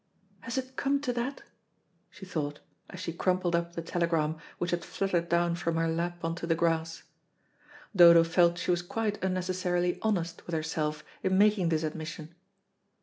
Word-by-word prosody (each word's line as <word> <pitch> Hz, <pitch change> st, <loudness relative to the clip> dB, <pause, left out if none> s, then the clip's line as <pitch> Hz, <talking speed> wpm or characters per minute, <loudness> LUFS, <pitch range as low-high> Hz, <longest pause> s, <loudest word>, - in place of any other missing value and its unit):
"Has 230 Hz, +6 st, -5 dB
it 260 Hz, 0 st, -4 dB
come 280 Hz, 0 st, +1 dB
to 255 Hz, -4 st, -1 dB
that?" 245 Hz, +4 st, -3 dB, 0.7 s
she 190 Hz, -, -11 dB
thought, 150 Hz, -5 st, -3 dB, 0.3 s
as 180 Hz, -, -9 dB
she 175 Hz, -3 st, -4 dB
crumpled 180 Hz, 0 st, +1 dB
up 170 Hz, 0 st, -1 dB
the 165 Hz, -, -3 dB
telegram 165 Hz, -2 st, 0 dB, 0.2 s
which 175 Hz, -, -2 dB
had 175 Hz, -1 st, -1 dB
fluttered 175 Hz, -3 st, -1 dB
down 170 Hz, 0 st, +2 dB
from 170 Hz, -1 st, -2 dB
her 165 Hz, 0 st, +1 dB
lap 170 Hz, +1 st, -2 dB
on 165 Hz, -, 0 dB
to 170 Hz, -, -5 dB
the 165 Hz, -, +2 dB
grass. 165 Hz, 0 st, 0 dB, 0.9 s
Dodo 170 Hz, -2 st, +9 dB
felt 170 Hz, +1 st, +3 dB
she 180 Hz, -, 0 dB
was 175 Hz, -1 st, +1 dB
quite 210 Hz, +3 st, -3 dB
unnecessarily 180 Hz, -1 st, 0 dB
honest 175 Hz, -6 st, -1 dB
with 170 Hz, -, -2 dB
herself 155 Hz, -1 st, -2 dB, 0.2 s
in 190 Hz, 0 st, +1 dB
making 205 Hz, -4 st, +4 dB
this 160 Hz, -1 st, +1 dB
admission. 155 Hz, +1 st, -5 dB
170 Hz, 170 wpm, -29 LUFS, 165-185 Hz, 0.9 s, Dodo